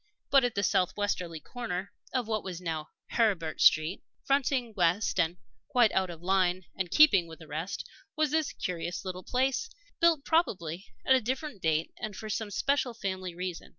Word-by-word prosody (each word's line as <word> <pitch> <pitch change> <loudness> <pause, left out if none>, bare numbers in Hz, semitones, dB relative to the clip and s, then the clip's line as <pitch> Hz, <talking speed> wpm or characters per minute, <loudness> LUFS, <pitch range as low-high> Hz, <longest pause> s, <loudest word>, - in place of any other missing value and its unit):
But 275 -2 +6
at 245 -2 0
the 200 - 0
southwesterly 185 -3 0
corner 200 -6 -5 0.2
of 250 -4 -1
what 215 -2 -1
was 180 -3 -5
now 160 -3 -4 0.2
Heribert 190 -9 +1
Street, 155 +4 +4 0.2
fronting 265 -4 +1
west 180 +2 +2
and 170 +2 +1 0.3
quite 240 -3 +4
out 190 -1 +1
of 170 -1 -9
line 185 -1 +2
and 190 -2 -2
keeping 200 - +6
with 160 -1 -10
the 160 - -12
rest, 160 +6 -4 0.3
was 310 -2 +1
this 315 -1 +1
curious 175 -2 -4
little 185 -1 -4
place, 265 - 0 0.3
built 330 -4 +4
probably 190 - 0 0.2
at 265 - +6
a 260 - +4
different 260 - -3
date 160 0 +1
and 215 -2 -5
for 215 +1 -6
some 215 +1 -2
special 260 +3 0
family 185 -4 -4
reason. 180 -1 -5
195 Hz, 175 wpm, -30 LUFS, 175-245 Hz, 0.3 s, But